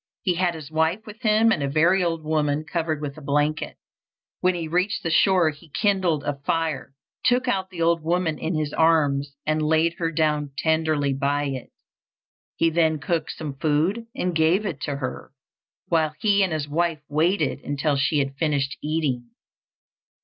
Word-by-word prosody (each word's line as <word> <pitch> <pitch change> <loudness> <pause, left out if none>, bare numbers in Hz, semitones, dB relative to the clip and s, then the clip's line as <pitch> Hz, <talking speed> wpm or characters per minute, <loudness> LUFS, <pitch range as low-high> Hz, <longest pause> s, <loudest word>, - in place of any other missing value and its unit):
He 185 - +2
had 175 -1 0
his 155 -2 -9
wife 160 +6 0
with 215 0 -11
him 220 +1 +4
and 185 - +1
a 140 - -1
very 170 +6 +3
old 165 -2 -1
woman 150 -1 0
covered 160 -2 -2
with 145 +1 -5
a - - -14
blanket. 150 +2 -1 0.6
When 185 0 +2
he 165 -2 -3
reached 180 +5 0
the 165 - -1
shore 180 -2 +4
he 155 +3 -17
kindled 185 -4 +1
a 145 -1 -3
fire, 155 -2 -2 0.3
took 250 +1 +2
out 190 -5 0
the 175 -3 -3
old 170 0 +2
woman 165 0 0
in 165 +1 -2
his 155 -1 -2
arms 145 -4 +2
and 155 0 +1
laid 160 +3 +1
her 165 -1 0
down 150 -3 0
tenderly 155 -3 +1
by 140 +2 0
it. 135 -3 -4 0.9
He 165 0 +2
then 160 -1 +2
cooked 160 +2 -2
some 150 -3 -6
food 165 +11 0
and 180 -1 -1
gave 165 +6 +3
it 160 -9 -4
to 145 - -3
her, 130 -1 -6 0.5
while 155 -2 +1
he 205 -2 +3
and 190 -2 +2
his 155 -2 -2
wife 160 0 -1
waited 155 0 +1
until 145 +1 0
she 145 +2 +1
had 135 -1 0
finished 145 -3 0
eating. 145 -6 -1
160 Hz, 180 wpm, -24 LUFS, 145-175 Hz, 0.9 s, him